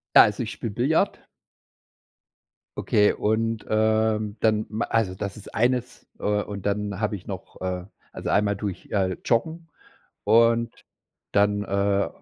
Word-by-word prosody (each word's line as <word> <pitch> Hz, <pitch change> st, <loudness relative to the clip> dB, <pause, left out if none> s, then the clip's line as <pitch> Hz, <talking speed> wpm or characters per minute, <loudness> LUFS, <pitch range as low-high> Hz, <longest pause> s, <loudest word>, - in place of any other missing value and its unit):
Ja, -, -, +11 dB
also -, -, 0 dB
ich -, -, -5 dB
spiele 115 Hz, -, -5 dB
Billard. 130 Hz, +9 st, 0 dB, 1.5 s
Okay, 105 Hz, 0 st, +3 dB
und, 110 Hz, +1 st, -1 dB
ähm, 110 Hz, 0 st, +1 dB
dann, 110 Hz, -1 st, +2 dB
ma 110 Hz, +2 st, -2 dB
also, 110 Hz, -5 st, 0 dB
das 100 Hz, +1 st, -5 dB
ist 105 Hz, -, -12 dB
eines, 125 Hz, +1 st, 0 dB
äh, -, -, -13 dB, 0.2 s
und 100 Hz, -1 st, -5 dB
dann 100 Hz, -1 st, -2 dB
habe 110 Hz, -1 st, 0 dB
ich 95 Hz, -, -10 dB
noch, 95 Hz, -3 st, -8 dB
äh 90 Hz, -1 st, -3 dB, 0.3 s
also -, -, -5 dB
einmal 100 Hz, 0 st, +2 dB
tue 100 Hz, +1 st, -3 dB
ich, -, -, -14 dB
äh, 95 Hz, -3 st, 0 dB
joggen 160 Hz, +8 st, 0 dB, 0.6 s
und 115 Hz, +2 st, +3 dB, 0.5 s
dann, 105 Hz, 0 st, +2 dB
äh, 100 Hz, 0 st, +1 dB
105 Hz, 145 wpm, -25 LUFS, 100-115 Hz, 1.5 s, Ja